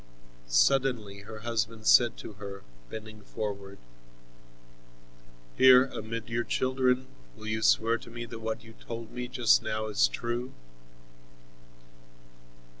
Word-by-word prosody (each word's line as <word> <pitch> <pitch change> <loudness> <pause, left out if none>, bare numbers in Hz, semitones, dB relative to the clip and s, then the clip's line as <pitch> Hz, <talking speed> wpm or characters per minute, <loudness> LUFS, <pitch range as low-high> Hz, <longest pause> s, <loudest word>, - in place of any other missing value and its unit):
Suddenly 105 - +2
her 110 +2 -10
husband 115 -1 -2
said 120 0 +6
to - - -9
her, 100 -1 -9 0.3
bending 110 -1 -9
forward: 100 -2 -6 1.8
"Here, 130 0 +8
amid 115 -3 -6
your 115 +1 -1
children, 130 +1 +1 0.3
will 110 - -11
you 110 0 -2
swear 115 +2 +3
to - - -12
me 120 0 -6
that 115 0 -9
what 110 0 -4
you 115 0 -14
told 115 0 -8
me 125 0 -5
just - - +4
now 110 0 -2
is 100 - +3
true?" 120 - -4
110 Hz, 120 wpm, -29 LUFS, 105-120 Hz, 1.8 s, Here